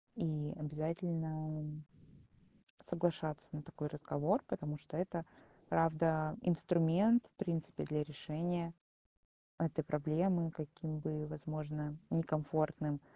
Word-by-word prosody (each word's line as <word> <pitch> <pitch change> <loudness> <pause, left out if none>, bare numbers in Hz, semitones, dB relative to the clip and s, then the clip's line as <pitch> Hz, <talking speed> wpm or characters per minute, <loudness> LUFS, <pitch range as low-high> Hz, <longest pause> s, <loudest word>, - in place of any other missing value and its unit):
и 150 -2 0
обязательно 155 0 -1 1.2
соглашаться 160 -3 0
на 150 - -4
такой 150 0 -4
разговор. 150 - +1
Потому 150 0 -2
что 150 - -6
это 175 -2 -1 0.4
правда 160 -1 +3
инструмент 180 +6 +5
в - - -27
принципе 170 -6 -1
для 150 0 +1
решения 170 +3 -2 0.9
этой 160 -1 +1
проблемы, 165 +4 +2
каким 155 0 -4
бы 150 0 -2
возможно 150 0 -4
некомфортным 155 -2 +1
155 Hz, 95 wpm, -37 LUFS, 150-165 Hz, 1.2 s, инструмент